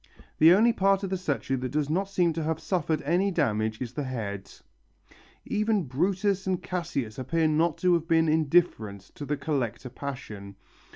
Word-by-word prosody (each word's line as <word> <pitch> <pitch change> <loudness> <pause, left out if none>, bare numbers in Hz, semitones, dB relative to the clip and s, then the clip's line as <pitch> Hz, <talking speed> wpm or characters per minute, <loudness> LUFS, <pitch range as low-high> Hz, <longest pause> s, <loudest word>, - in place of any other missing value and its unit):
The 160 +2 +8
only 225 +6 +5
part 195 -2 +2
of 195 - -3
the - - +1
statue 135 -7 -2
that 130 0 -3
does 145 +2 -1
not 190 +6 -1
seem 175 -4 +2
to 165 - -3
have 160 0 -1
suffered 160 -4 -1
any 175 +7 +2
damage 110 - 0
is 125 -2 -5
the 145 0 -3
head. 100 -6 -5 0.9
Even 215 -2 +1
Brutus 190 +8 0
and 185 -2 0
Cassius 140 -11 -3
appear 160 +5 +1
not 155 +1 +1
to 180 -1 +3
have 165 -1 0
been 165 -1 +3
indifferent 155 - +2
to 145 - -7
the 145 +1 -2
collector 130 -5 -2
passion. 115 -7 -7
155 Hz, 175 wpm, -27 LUFS, 130-180 Hz, 0.9 s, The